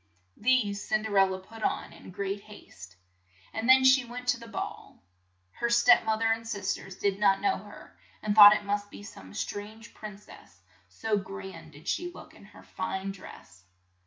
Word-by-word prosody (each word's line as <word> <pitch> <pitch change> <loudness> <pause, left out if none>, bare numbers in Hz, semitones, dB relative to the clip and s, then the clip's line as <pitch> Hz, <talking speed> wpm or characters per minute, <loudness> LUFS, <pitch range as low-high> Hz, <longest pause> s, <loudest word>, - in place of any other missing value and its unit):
These 215 -4 +1
Cin 215 0 +1
der 215 -2 -4
el 195 - +6
la 190 0 -4
put 220 +4 -13
on - - -2
in - - -13
great 195 +2 -4
haste, 95 - -14 0.6
and 225 +3 -2
then 260 0 +7
she 260 0 +6
went 245 +1 -9
to - - +2
the 230 - -11
ball. 225 - -7 0.5
Her 235 - -2
step 240 +1 +5
moth 220 0 0
er 225 - +3
and 225 0 -7
sis 200 -3 -2
ters 190 -1 -9
did 200 0 -1
not 195 -2 +4
know 390 -1 +1
her, - - -14 0.3
and 210 -1 0
thought 205 0 +10
it 205 - -4
must 205 0 -2
be 205 - -11
some 95 - -12
strange 215 +3 -6
prin 210 -2 -9
cess, 210 - -17 0.3
so 220 -2 -1
grand 190 -4 -8
did 145 +2 -15
she 350 0 -2
look - - -13
in - - -16
her - - -16
fine 190 +1 -4
dress. 90 - -13
205 Hz, 195 wpm, -28 LUFS, 195-225 Hz, 0.6 s, thought